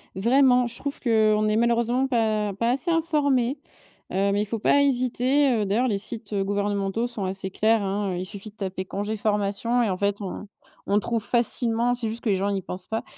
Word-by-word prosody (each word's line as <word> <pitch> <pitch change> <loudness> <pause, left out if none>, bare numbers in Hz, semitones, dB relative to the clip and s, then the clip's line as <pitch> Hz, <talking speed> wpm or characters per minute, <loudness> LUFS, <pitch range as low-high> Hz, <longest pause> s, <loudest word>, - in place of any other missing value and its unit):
Vraiment, 250 +4 +3
je 235 - -6
trouve 280 0 -5
qu'on 215 -3 +2
n'est 215 0 +1
malheureusement 235 +2 +2
pas 220 -5 0
pas 230 +5 -1
assez 275 +7 0
informé, 290 -6 +1 0.5
heu, 195 +2 +1
mais 205 +1 +1
il - - -5
faut 225 +2 -4
pas 280 +6 +3
hésiter, 260 +1 +2
heu, 220 -4 0
d'ailleurs 225 +6 +1
les 205 - 0
sites 210 +1 -4
gouvernementaux 200 +2 -1
sont 235 -4 -5
assez 190 0 -2
clairs, 220 +3 +2
hein. 195 -1 -2
Il 180 +1 -4
suffit 200 +2 -7
de - - -37
taper 190 -2 -4
«congé 205 +3 -4
formation» 210 +3 0
et 220 - 0
en 185 - -2
fait, 200 +1 -1
on 200 +1 -6 0.4
on 205 +1 +2
trouve 230 0 -2
facilement, 235 +1 +2
c'est 235 -2 -2
juste 225 +2 -5
que 230 - 0
les 200 - +3
gens 195 +2 -1
y 195 -1 -1
pensent 180 +1 -7
pas. 225 0 -3
220 Hz, 210 wpm, -24 LUFS, 200-245 Hz, 0.5 s, Vraiment